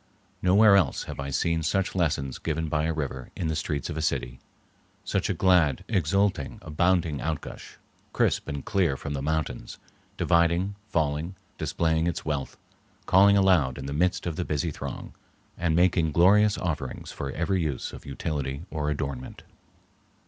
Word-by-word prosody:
Nowhere 100 +3 +6
else 90 -8 +1
have - - -8
I 70 0 -3
seen 80 +4 0
such 95 +5 0
lessons 70 -7 -1
given 80 0 -2
by 75 +1 0
a 80 - +1
river 70 -5 -4
in 80 - -2
the 80 - -1
streets 75 -2 -2
of 85 - -5
a 80 - -2
city, 60 -5 -2 0.6
such - - -1
a - - +2
glad, 90 -8 +3
exulting, 95 -4 +1
abounding 85 -1 +1
outgush, 80 -1 -5 0.3
crisp - - +1
and 70 -1 -5
clear 90 -10 +1
from 70 - -5
the 70 - -3
mountains, 80 +1 -3 0.4
dividing, 85 +3 +2 0.2
falling, 80 +2 -1 0.2
displaying 80 0 0
its 85 - -3
wealth, 75 -3 -3 0.5
calling 100 +2 +6
aloud 90 -10 +3
in 65 - -6
the 70 - -4
midst 90 +5 +1
of 85 -3 -3
the 90 - 0
busy 75 0 -1
throng, - - -7 0.4
and 85 -2 0
making 85 -3 +3
glorious 105 +5 +5
offerings 75 -7 -4
for 70 -1 -5
every 90 +3 0
use 75 -6 -3
of - - -10
utility 70 +1 -4
or 75 -2 -1
adornment. 70 -3 -4
80 Hz, 160 wpm, -27 LUFS, 70-90 Hz, 0.6 s, Nowhere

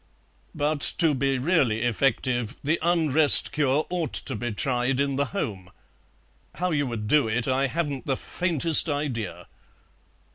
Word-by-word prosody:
But, 150 0 -1 0.2
to 165 -3 +3
be 135 0 0
really 130 -7 +1
effective, 120 0 0
the 155 +4 0
Unrest 160 -3 +4
cure 145 0 +1
ought 175 -4 -2
to 130 - -2
be 120 +2 -4
tried 125 +4 -1
in 140 -1 0
the 140 +1 0
home. 105 - -5 0.9
How 180 0 -2
you 145 -3 0
would 110 -3 -5
do 145 0 +3
it 115 +2 -2
I 135 +1 +1
haven't 145 -4 -4
the 135 -2 0
faintest 165 -2 +1
idea." 135 -9 -4
140 Hz, 145 wpm, -25 LUFS, 120-155 Hz, 0.9 s, Unrest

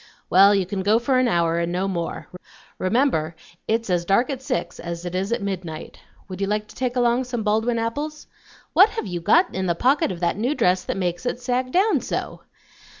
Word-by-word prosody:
Well, 200 +3 +7
you 195 -2 +1
can 190 +1 -3
go 210 +3 +3
for 255 +2 +1
an 255 - +3
hour, 170 -5 +1
and 170 0 -1
no 185 +2 -1
more. 170 -3 -4 0.5
Remember 185 - +1 0.3
it's 225 +1 0
as 175 -2 +1
dark 200 +9 +2
at 265 -1 -5
six 255 -10 -3
as 170 0 -6
it 175 - -5
is 190 +4 -2
at 235 - -1
midnight 180 -5 -5 0.3
Would 185 0 -7
you 195 - 0
like 210 +1 -1
to - - -14
take 250 -1 -2
along 245 +1 +2
some 240 -3 -3
Baldwin 220 +3 +1
apples? 290 +7 -3 0.5
What 390 +4 +7
have 450 - -4
you 175 -3 -4
got 335 - +3
in 190 0 -2
the 170 - +1
pocket 260 - +2
of 175 - -6
that 175 +1 0
new 250 +7 0
dress 180 -5 +2
that - - -3
makes 180 +4 -2
it 245 - -2
sag 255 0 -1
down 390 +7 +3
so?" - - -4
210 Hz, 215 wpm, -23 LUFS, 180-250 Hz, 0.5 s, Well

